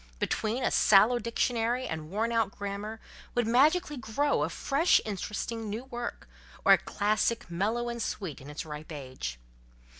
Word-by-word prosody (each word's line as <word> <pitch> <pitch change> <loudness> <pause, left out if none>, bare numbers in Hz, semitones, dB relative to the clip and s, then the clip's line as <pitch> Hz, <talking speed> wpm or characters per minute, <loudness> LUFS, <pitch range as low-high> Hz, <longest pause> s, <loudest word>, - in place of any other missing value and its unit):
Between 225 - -1
a - - +2
sallow 215 +4 +5
dictionary 235 +1 0
and 155 -1 -5
worn 220 +5 -1
out 225 -3 +2
grammar 205 +2 -5 0.4
would 240 -1 +2
magically 295 +7 +3
grow 255 +5 0
a - - +1
fresh 295 +6 +3
interesting 215 +2 -4
new 220 +4 -4
work, 240 -2 -6 0.4
or - - +9
a - - +5
classic, 215 -1 0
mellow 220 +7 0
and 235 0 -3
sweet 180 -11 -4
in 135 - -10
its 150 +2 -5
ripe 150 +1 -8
age. 130 - -6
220 Hz, 155 wpm, -29 LUFS, 195-240 Hz, 0.4 s, or